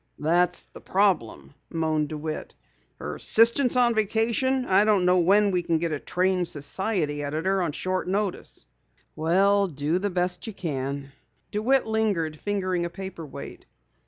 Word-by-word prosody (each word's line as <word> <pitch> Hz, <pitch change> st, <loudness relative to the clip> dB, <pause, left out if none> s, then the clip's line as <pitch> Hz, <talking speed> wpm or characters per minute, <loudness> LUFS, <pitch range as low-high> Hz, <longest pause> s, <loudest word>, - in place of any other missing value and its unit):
"That's 175 Hz, +3 st, +1 dB
the -, -, -11 dB
problem," 185 Hz, -, 0 dB, 0.2 s
moaned 155 Hz, -2 st, -1 dB
DeWitt. 155 Hz, 0 st, -5 dB, 0.4 s
"Her -, -, -6 dB
assistant 235 Hz, +4 st, +4 dB
is -, -, 0 dB
on 240 Hz, -1 st, +4 dB
vacation. 230 Hz, +4 st, 0 dB
I 195 Hz, -1 st, +4 dB
don't 210 Hz, -4 st, +3 dB
know 180 Hz, 0 st, +4 dB
where 200 Hz, +4 st, +4 dB
we 180 Hz, -3 st, +1 dB
can 170 Hz, -1 st, 0 dB
get 165 Hz, 0 st, -2 dB
a 150 Hz, -, -2 dB
trained 180 Hz, +1 st, 0 dB
society 150 Hz, 0 st, -1 dB
editor 165 Hz, +7 st, -1 dB
on 170 Hz, -4 st, -1 dB
short 185 Hz, +5 st, -2 dB
notice." 195 Hz, 0 st, -3 dB, 0.5 s
"Well, 195 Hz, +5 st, +3 dB
do 150 Hz, +2 st, -1 dB
the 205 Hz, +2 st, -1 dB
best 180 Hz, 0 st, -1 dB
you 220 Hz, -, -5 dB
can." 140 Hz, -5 st, -4 dB, 0.4 s
DeWitt 250 Hz, +6 st, +2 dB
lingered, 200 Hz, -9 st, -1 dB
fingering 185 Hz, -3 st, -1 dB
a 170 Hz, -, -2 dB
paper 180 Hz, -3 st, -8 dB
weight. -, -, -10 dB
185 Hz, 155 wpm, -25 LUFS, 160-205 Hz, 0.5 s, assistant